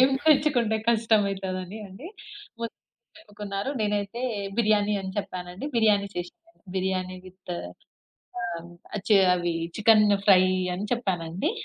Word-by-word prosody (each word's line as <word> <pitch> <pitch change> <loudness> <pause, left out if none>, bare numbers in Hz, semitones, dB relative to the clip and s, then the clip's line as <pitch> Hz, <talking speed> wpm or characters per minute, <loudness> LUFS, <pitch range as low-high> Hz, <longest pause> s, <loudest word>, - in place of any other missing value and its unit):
ఏం 260 +1 +6 0.2
తెచ్చుకుంటే 275 -7 +4
కష్టం 225 -2 +4
అయితది 190 -1 -3
అని 195 +5 -9
అండి, 195 - -11 0.5
మొత్తం 230 -1 -5 0.4
చెప్పుకున్నారు. 205 -4 -5
నేనైతే 210 +2 -1 0.4
బిర్యానీ 210 -2 +3
అని 190 - -4
చెప్పానండి. 180 +1 -5
బిర్యానీ 210 -3 +4
చేశాను. 180 - -8 0.2
బిర్యానీ 185 -1 -1
విత్ 185 0 -9 0.9
ఆహ్, 170 -1 -5 0.4
చె 210 - +7 0.2
అవి 175 -1 -1 0.2
చికెన్ 215 0 +6 0.2
ఫ్రై 185 -2 +7 0.3
అని 190 +3 -4
చెప్పానండి. 190 - -1
200 Hz, 120 wpm, -26 LUFS, 185-220 Hz, 0.9 s, చె